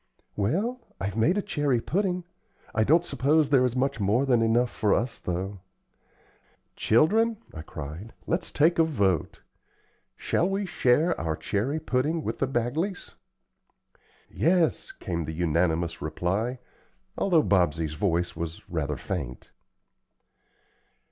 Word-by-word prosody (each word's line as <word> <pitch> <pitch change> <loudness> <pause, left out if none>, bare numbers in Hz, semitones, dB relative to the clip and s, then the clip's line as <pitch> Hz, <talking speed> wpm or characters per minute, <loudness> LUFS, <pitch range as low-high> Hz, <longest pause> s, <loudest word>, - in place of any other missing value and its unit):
"Well, 200 - -1 0.2
I've 100 +2 -3
made 150 - +2
a 205 - 0
cherry 145 -10 0
pudding; 180 - -1 0.5
I 110 0 +2
don't 165 +8 +4
suppose 150 +1 +2
there 135 -3 +5
is 125 -1 -1
much 130 -1 0
more 105 +7 +2
than 125 -4 +3
enough 115 +2 +2
for 105 -3 +2
us, 120 +1 -2
though." 95 +3 -4 1.2
"Children," 215 - +3 0.2
I 80 - -6
cried, 80 +7 -8
"let's 170 - -1
take 165 +3 +3
a - - +7
vote. 100 - 0 0.7
Shall 175 - 0
we 195 +1 -1
share 160 -1 +2
our 80 -1 -1
cherry 125 - -1
pudding 150 +4 0
with - - -3
the 135 - +1
Bagleys?" 135 - -2 1.1
"Yes," 170 -1 +1
came 85 -2 -4
the 80 - -5
unanimous 85 0 0
reply, 95 +11 -1 0.6
although 170 -6 +3
Bobsey's 80 -5 +1
voice 85 +1 0
was 80 0 -6
rather 75 -4 -2
faint. 70 -8 -5
120 Hz, 130 wpm, -27 LUFS, -, 1.2 s, a